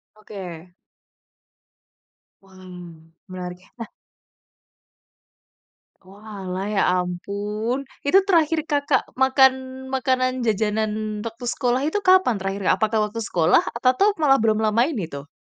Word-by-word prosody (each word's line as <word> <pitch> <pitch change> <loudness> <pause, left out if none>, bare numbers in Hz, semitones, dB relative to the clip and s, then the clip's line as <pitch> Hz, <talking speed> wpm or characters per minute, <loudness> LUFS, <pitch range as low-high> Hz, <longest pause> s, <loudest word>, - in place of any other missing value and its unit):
Oke. 185 -5 -10 1.7
Wah, 190 -1 -21 0.8
menarik. 180 -1 -7 0.2
Nah 230 -2 -7 2.2
Oalah, 195 -1 -7
ya 205 -2 +1
ampun. 205 +7 -3 0.3
Itu, 330 +7 +5
terakhir 325 -4 +3
Kakak 285 -3 +1 0.2
makan, 265 0 +5 0.4
makanan, 255 -1 0
jajanan 215 0 0 0.3
waktu 230 +2 -7
sekolah, 250 +1 0
itu 365 - -2
kapan 370 - +4
terakhir, 195 +1 -4
Kak? - - +5
Apakah 220 0 +1
waktu 230 - -6
sekolah? 170 0 +3
Apa 255 +1 +2
tuh, 410 +1 +3
malah 270 -2 +5
belum 220 -1 +1
lama 220 +3 +2
ini, 215 - -4
tuh? 140 +1 -8
220 Hz, 115 wpm, -22 LUFS, 195-260 Hz, 2.2 s, Itu